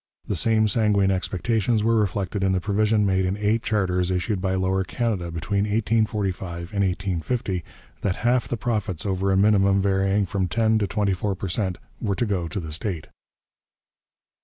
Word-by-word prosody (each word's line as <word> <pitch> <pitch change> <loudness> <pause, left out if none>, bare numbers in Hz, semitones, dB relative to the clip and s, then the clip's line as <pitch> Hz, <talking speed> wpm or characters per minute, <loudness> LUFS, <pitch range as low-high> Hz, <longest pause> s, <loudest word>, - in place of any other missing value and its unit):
The 100 - -1
same 110 +4 +2
sanguine 105 -3 +2
expectations 105 +4 0
were 115 +1 +3
reflected 100 -2 0
in 95 -1 +2
the 95 - +1
provision 105 +2 +2
made 95 -1 +2
in 95 +2 -1
eight 105 +2 +1
charters 90 -5 0
issued 95 +2 -1
by 95 0 0
Lower 95 0 +1
Canada 100 -4 -2
between 100 +5 -1
1845 105 -5 -1
and 100 -1 +1
1850, 95 +1 -2 0.4
that 95 -2 0
half 120 0 +3
the 120 - -2
profits 105 -5 -2
over 95 0 0
a 95 - +3
minimum 100 -1 +4
varying 95 +1 +2
from 95 0 -1
ten 110 +3 +2
to 100 - 0
twenty 100 -1 0
four 100 +2 -2
per 95 0 -5
cent 95 -1 -1 0.2
were 100 -4 0
to 120 - 0
go 95 -5 -1
to 100 - -4
the 80 -3 -6
state. 85 0 -4
100 Hz, 175 wpm, -24 LUFS, 95-105 Hz, 0.4 s, minimum